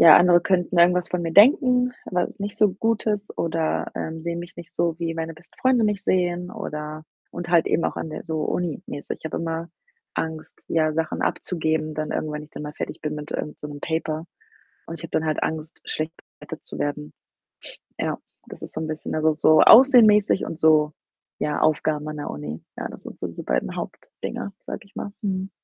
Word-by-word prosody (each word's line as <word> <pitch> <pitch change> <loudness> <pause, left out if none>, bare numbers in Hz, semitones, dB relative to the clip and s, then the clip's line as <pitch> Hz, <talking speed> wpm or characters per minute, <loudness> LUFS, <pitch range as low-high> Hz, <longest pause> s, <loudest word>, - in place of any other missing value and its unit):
ja, 160 -2 +10
andere 175 -1 +6
könnten 180 -1 +1
irgendwas 180 +1 +5
von 180 -1 -1
mir 165 -1 -2
denken, 250 - +6
was 180 +2 -2
nicht 200 0 -4
so 210 -3 +4
gut 225 +3 0
ist 210 -1 -1
oder, 165 -1 -1
ähm, 160 0 -4
sehen 170 +1 -3
mich 175 0 -8
nicht 170 -1 -11
so, 170 -1 0
wie 165 -1 -1
meine 165 0 -4
besten 160 +2 -21
Freunde 255 -2 +3
mich 210 -3 0
sehen 180 -1 0
oder 150 +1 -6 0.3
und 175 0 -5
halt 170 -2 +4
eben 170 - +1
auch - - -1
an - - -3
der 155 - -7
so 160 -2 -2
uni-mäßig. 160 -4 -3
Ich - - -23
habe 160 - -3
immer 165 0 -3 0.5
Angst, 160 -1 -5
ja, 155 -1 +2
Sachen 160 0 -1
abzugeben, 155 -3 -1
dann 155 0 -3
irgendwann, 155 -1 -2
wenn 150 - -4
ich 150 - -19
dann - - -7
mal 150 - -6
fertig - - -5
bin 150 -1 -3
mit 150 0 -6
irgend 150 - -4
so - - -6
'nem 145 -1 -8
Paper 160 0 -2 0.6
und 165 - -5
ich 160 - -12
habe 165 - -7
dann 160 - +1
halt 155 -1 0
Angst, 160 0 -4
schlecht 155 +1 -3 0.3
bewertet - - -9
zu - - -6
werden. 150 +1 -3 0.9
Ja, - - -1 0.3
das - - -10
ist - - -8
so 160 - -3
'n 160 - -3
bisschen 155 0 -4
also 155 0 +3
so 155 +1 +5
Aussehen-mäßig 220 -6 +7
und 165 - -6
so, 155 -1 +5 0.5
ja, 150 - 0
Aufgaben 155 -1 +1
an 155 0 -5
der 145 - -4
Uni. 75 +2 -6
Ja, - - -3
das - - -11
sind - - -9
so - - -3
diese - - -8
beiden - - -1
Hauptdinger, 200 - -6
sage - - -5
ich 200 - -24
mal. 200 - -5
Mhm. 190 -1 -2
165 Hz, 210 wpm, -24 LUFS, 155-180 Hz, 0.9 s, ja